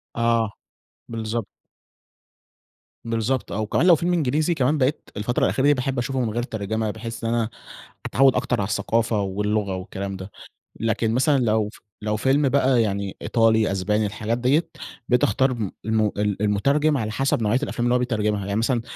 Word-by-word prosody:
آه، 115 -2 +1 0.6
بالضبط. 115 -1 -3 1.6
بالضبط 115 +2 -1
آه، 105 - -2
وكمان 110 +8 +1
لو 180 -2 +8
فيلم 175 +3 0
إنجليزي 155 +1 +1
كمان 145 0 +1
بقيت 140 +2 -1
الفترة 110 +4 -1
الأخيرة 135 - +2
دي 145 - +6
باحب 135 0 -2
أشوفه 130 +2 -1
من 120 - 0
غير 120 +3 -2
ترجمة، 110 -1 -2
بحيث 115 +2 -7
إن 115 - 0
أنا 115 -1 0 0.6
أتعود 135 -1 +4
أكتر 125 -4 0
على 95 - -1
الثقافة 110 0 0
واللغة 100 0 -1
والكلام 95 +1 -5
ده. 95 +2 -9 0.5
لكن 110 0 0
مثلًا 135 +4 +3
لو 110 -3 +1
ف - - -16 0.2
لو 105 0 0
فيلم 135 +4 +2
بقى 130 -2 +3
يعني 100 -2 -2
إيطالي، 110 -2 +2
أسباني، 105 +3 0
الحاجات 110 +3 -2
دِيَّة، 135 +7 +2 0.4
بقيت 125 0 +3
أختار 130 +5 +2
م 110 -6 -3
الم 110 0 +1 0.2
ال 105 -1 -1
المترجم 140 +9 +2
على 110 -4 -2
حسب 135 +1 0
نوعية 110 +4 +2
الأفلام 120 -4 -2
اللي 120 +1 +3
هو 125 - +3
بيترجمها، 105 -4 0
يعني 100 +2 0
مثلًا 120 +1 +1
115 Hz, 175 wpm, -23 LUFS, 105-130 Hz, 1.6 s, لو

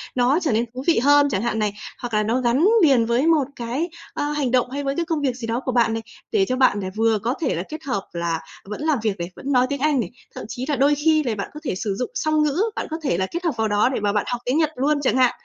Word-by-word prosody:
nó 255 +5 +3
trở 310 - 0
nên 225 +2 +1
thú 255 +1 -6
vị 325 - +4
hơn 285 +2 +5
chẳng 190 -5 -1
hạn 230 -1 -1
này. 210 -1 0 0.3
Hoặc 245 -2 -5
là 215 0 +2
nó 230 +4 0
gắn 255 +9 +3 0.2
liền 265 -7 +5
với 240 +6 +1
một 320 -4 +4
cái, 245 +9 -3 0.2
ơ, - - -2
hành 285 -4 -1
động 250 -1 +2
hay 280 +2 -4
với 275 0 -1
cái 340 +1 -1
công 315 -2 -1
việc 260 -4 0
gì 240 -2 -6
đó 235 +3 -1
của 255 - 0
bạn 235 -2 +2
này, 225 - -3 0.3
để 415 -3 +3
cho 255 - -1
bạn 255 -6 +3
này 190 -2 -3
vừa 225 0 +2
có 240 +2 +1
thể 290 - 0
là - - -2
kết 310 0 -7
hợp 250 -9 -3
là 170 -1 -1 0.3
vẫn 210 +7 -6
làm 305 -5 +1
việc 210 -3 0
này, 170 0 -4
vẫn 280 - -5
nói 255 -1 +4
tiếng 280 - -2
Anh 295 -1 +2
này. 195 - -2 0.3
Thậm - - -6
chí 245 +3 -5
là 295 - +2
đôi 280 +3 +3
khi 310 +1 +2
này 235 -5 -1
bạn 200 - -4
có 300 - -8
thể 260 - -2
sử 195 +1 -2
dụng 250 +4 -3
song 310 -1 +1
ngữ, 300 +5 +1
bạn - - -3
có 320 - -2
thể 175 -11 +1
là 190 - 0
kết 345 +2 -4
hợp 335 - +1
vào 220 -1 +1
đó 205 +4 +2
để 265 - -2
mà 205 -1 0
bạn 210 - 0
học 245 -1 -3
tiếng 255 +4 +1
Nhật 315 -2 +2
luôn 290 +3 +1
chẳng 260 -2 +1
hạn. 255 -2 +5
255 Hz, 310 wpm, -22 LUFS, 225-295 Hz, 0.3 s, hơn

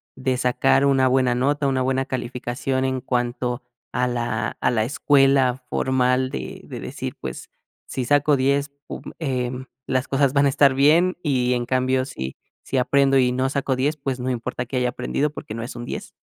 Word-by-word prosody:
de 130 -1 -1
sacar 125 +2 +3
una 135 -1 +4
buena 130 -1 +3
nota, 140 +3 +1
una 130 -1 +1
buena 130 +1 +1
calificación 125 +1 -3
en 130 -1 -1
cuanto 125 0 -2 0.3
a 125 0 +1
la 120 -3 -2
a 125 - +3
la 110 -3 +1
escuela 135 -2 +3
formal 130 0 +1
de - - -6
de - - -8
decir: - - -6
"Pues, - - -7 0.4
si 130 - -3
saco 145 +2 +3
10 140 +2 +1 0.2
um - - -6 0.2
eh, 130 -6 -1 0.3
las 130 0 0
cosas 135 -1 +2
van 140 0 +4
a - - +4
estar 135 0 +4
bien. 160 +7 +4
Y, 125 -4 +1
en 120 -1 -1
cambio, 130 +1 +1
si, 65 - -6 0.3
si 135 - -2
aprendo, 135 +1 +3
y 125 -1 +3
no 130 +1 0
saco 140 -1 -1
10 145 +4 0
pues, 135 -2 -3
no 125 +1 -2
importa 125 0 -3
qué 130 - -3
haya 125 0 +1
aprendido, 145 +4 -1
porque 130 - -8
no 115 +1 -4
es 120 - -7
un 120 - -6
10". - - -6
130 Hz, 190 wpm, -23 LUFS, 125-140 Hz, 0.4 s, una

